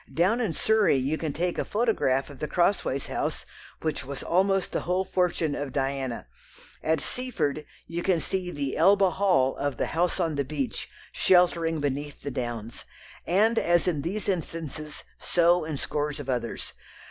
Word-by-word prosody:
Down 190 +9 +2
in 210 -8 0
Surrey 220 +2 +3
you 135 +4 0
can 160 -3 -2
take 175 +4 -1
a - - +1
photograph 205 - +1
of 135 - -12
the 150 - -2
Crossways 175 -7 +1
House - - -3 0.4
which 155 -2 -1
was 135 +1 -6
almost 195 +2 +2
the - - 0
whole 185 +2 0
fortune 175 -4 0
of 145 -2 -3
Diana, 135 - -2 0.6
at 160 0 +1
Seaford 155 - -2 0.2
you 170 +1 -4
can 175 -2 +2
see 180 +4 -2
the 140 -5 -3
"Elba 195 +2 +5
Hall" 180 -10 +2
of 145 -1 -2
The - - -2
House 175 +3 +1
on 165 -4 0
the 140 - +1
Beach 135 -5 -3 0.2
sheltering 170 -3 +3
beneath 145 +1 -3
the 140 - -3
downs, 120 -3 -4 0.4
and 220 +6 +4
as 175 0 +2
in 155 -5 +1
these 195 +8 -3
instances 160 -4 -4 0.2
so 175 -1 +3
in 155 -2 -3
scores 145 +1 -2
of 145 - -7
others. 120 -3 -3
160 Hz, 170 wpm, -27 LUFS, 140-180 Hz, 0.6 s, Elba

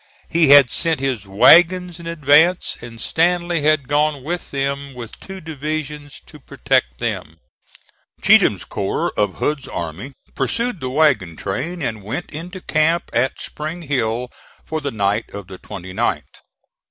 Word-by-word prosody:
He 165 -3 +3
had 140 -3 +8
sent 165 -3 0
his 130 -7 -2
wagons 175 - +5
in 170 - -9
advance, 160 +2 +3
and 115 -1 -10
Stanley 175 +3 +1
had 150 -3 +2
gone 145 -1 +1
with 170 +4 -4
them 140 0 -3
with 120 -2 -9
two 190 0 -9
divisions 150 -2 -5
to - - -14
protect 60 0 -1
them. - - -4 0.8
Cheatham's - - +4
corps - - -2
of 105 -2 0
Hood's 150 -2 -2
army 85 - -6 0.2
pursued 230 - -1
the 130 - -3
wagon 130 - +2
train 155 - -4
and 110 -4 -3
went 115 - -5
into 180 +5 -8
camp 160 +2 +1
at 125 +3 0
Spring 160 +3 -6
Hill, 125 -4 -1 0.4
for 155 0 -3
the 140 - -2
night 105 -1 -1
of 100 -2 -7
the 95 0 -11
29th. 95 -4 -3
145 Hz, 145 wpm, -20 LUFS, 120-165 Hz, 0.8 s, had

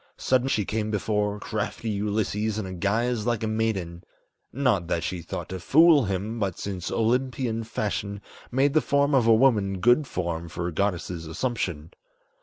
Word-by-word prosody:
Sudden 130 0 +1
she 110 -6 +1
came 110 +1 -2
before 105 -1 -1
crafty 110 +1 -3
Ulysses 105 +1 -1
in 95 -4 -5
guise 115 +3 0
like 115 -2 0
a - - 0
maiden; 100 -6 -2 0.5
Not 120 -10 +1
that 85 -1 -1
she 90 -2 -3
thought 85 - -6
to 95 - -5
fool 155 - +5
him, 100 +4 -3
but 95 -4 -1
since 95 -3 -4
Olympian 120 0 0
fashion 100 -2 -3 0.3
Made 135 +3 +2
the 155 - +4
form 140 0 +2
of 125 -4 +4
a 115 - +7
woman 105 -6 +3
good 120 +8 +4
form 85 -4 -3
for 85 +1 -4
a 90 - -4
goddess' 90 0 -1
assumption. 85 - -3
105 Hz, 165 wpm, -26 LUFS, 95-120 Hz, 0.5 s, a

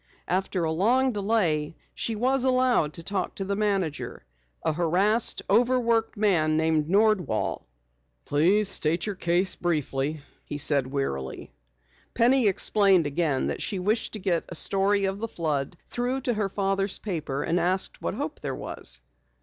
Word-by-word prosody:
After 185 -1 -1
a 160 - 0
long 245 +10 +2
delay 190 -8 0 0.2
she 225 - -2
was 255 +4 +1
allowed 255 - +2
to 170 - -6
talk 190 0 -3
to 195 - -4
the 200 +1 -1
manager, 195 - -2 0.4
a - - +2
harassed, 185 +8 +1
over 245 +5 +3
worked 230 -2 0
man 165 -7 +2
named 160 -1 +1
Nordwall. 210 -1 +1 0.6
"Please 185 +9 +2
state 165 -3 0
your 210 - -2
case 180 +1 +1
briefly," 150 -3 -2 0.2
he 145 - -6
said 140 -2 +3
wearily. 130 - -4 0.6
Penny 245 0 +4
explained 195 -2 +3
again 145 -2 0
that - - -3
she 200 - -2
wished 210 +5 -1
to 215 - -3
get 185 -4 0
a 175 - -7
story 195 +3 +2
of 195 +1 -2
the 230 - -3
flood 155 -5 -3
through 250 +2 -2
to 245 -1 0
her 210 -2 -1
father's 195 0 0
paper, 155 -8 -3
and 170 +2 0
asked 185 +2 0
what - - -3
hope - - -4
there - - -4
was. - - -3
190 Hz, 160 wpm, -26 LUFS, 160-215 Hz, 0.6 s, Penny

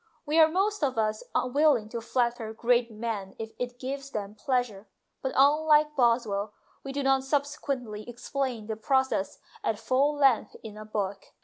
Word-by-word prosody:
We 310 +2 +2
are 320 - +8
most 395 +3 0
of 260 -4 0
us 215 -1 0
willing 260 -3 +3
to 235 0 -4
flatter 235 -1 -1
great 240 +1 +2
men 215 -3 -5
if 225 0 -6
it 245 0 -4
gives 275 +2 -5
them 205 -4 -5
pleasure, 220 -2 -2 0.3
but, 265 - -2
unlike 300 +2 +4
Boswell, 230 -5 +1 0.3
we 275 - -5
do 280 +1 -2
not 270 0 +3
subsequently 270 -6 -2
explain 245 -1 -3
the 220 0 -3
process 265 -3 0 0.3
at 220 - 0
full 260 +6 +1
length 270 -5 +3
in 215 -1 -8
a 215 0 -9
book. 205 -2 -3
245 Hz, 165 wpm, -28 LUFS, 220-275 Hz, 0.3 s, are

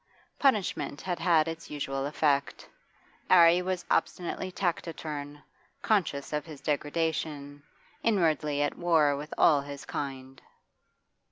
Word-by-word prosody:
Punishment 195 - +1
had 180 -2 -3
had 165 -3 +3
its 165 0 -6
usual 135 -2 -3
effect; 145 -1 0 0.6
'Arry 175 -1 +7
was 180 -1 -3
obstinately 185 +1 -1
taciturn, 155 -5 -4 0.4
conscious 165 -10 0
of 150 -1 -1
his 155 -2 -10
degradation, 150 -1 -2 0.4
inwardly 155 -8 +1
at 145 - -3
war 160 -5 +3
with 150 +2 -7
all 145 -3 +5
his 140 0 -8
kind. 135 -2 -6
150 Hz, 110 wpm, -29 LUFS, 145-170 Hz, 0.6 s, Arry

